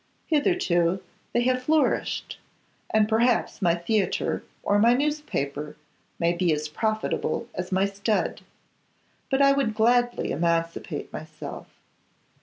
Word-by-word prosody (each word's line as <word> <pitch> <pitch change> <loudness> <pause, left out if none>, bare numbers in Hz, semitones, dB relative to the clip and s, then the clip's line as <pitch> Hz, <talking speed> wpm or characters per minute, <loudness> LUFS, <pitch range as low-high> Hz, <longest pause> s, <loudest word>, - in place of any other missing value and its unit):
Hitherto 195 - +2 0.3
they 240 - +2
have 255 0 +1
flourished, 305 +3 0 0.5
and 215 -1 +3
perhaps 230 +1 +1
my 170 -3 +3
theatre, 190 +4 0 0.2
or 205 - +2
my 235 +3 +5
newspaper, 150 - -2 0.4
may 170 0 +2
be 175 -1 +1
as 155 0 -1
profitable 215 +6 -1
as 180 0 -5
my 190 +1 +3
stud. 200 +2 -1 0.9
But 270 0 +3
I 275 - +6
would 275 -6 +1
gladly 240 +2 +2
emancipate 165 +1 -1
myself. - - -8
215 Hz, 115 wpm, -26 LUFS, 170-245 Hz, 0.9 s, I